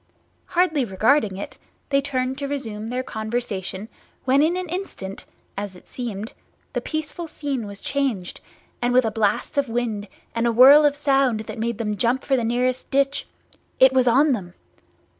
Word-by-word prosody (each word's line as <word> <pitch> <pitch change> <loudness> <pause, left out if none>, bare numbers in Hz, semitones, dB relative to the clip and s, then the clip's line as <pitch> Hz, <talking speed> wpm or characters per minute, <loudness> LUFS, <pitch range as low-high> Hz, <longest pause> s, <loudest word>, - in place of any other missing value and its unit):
Hardly 340 -6 +3
regarding 215 0 +2
it, 200 - -7 0.3
they 275 0 +3
turned 265 -1 -2
to 280 - -3
resume 225 -7 -4
their 250 +2 -2
conversation, 220 -4 -4 0.4
when 265 +2 +4
in 330 +4 +2
an 365 0 -3
instant 315 - -6 0.3
(as 200 -1 -5
it 180 - -16
seemed) 220 -3 -5 0.4
the - - -1
peaceful 315 +2 -4
scene 280 -7 -3
was 200 0 -9
changed, 260 -11 -2 0.4
and 245 0 +1
with 255 -1 +5
a 220 - 0
blast 220 +6 0
of 275 -3 -1
wind 225 -3 -2 0.3
and 230 +1 +1
a - - +3
whirl 270 +6 +8
of 290 -1 +3
sound 270 -6 +2
that 220 - -7
made 230 0 -1
them 210 -2 -2
jump 245 +4 +1
for 270 - +2
the 245 - 0
nearest 250 +2 0
ditch, 275 0 +1 0.5
It 260 0 +7
was 255 -1 +3
on 275 +5 +5
them! 180 -8 -3
250 Hz, 175 wpm, -23 LUFS, 220-280 Hz, 0.5 s, whirl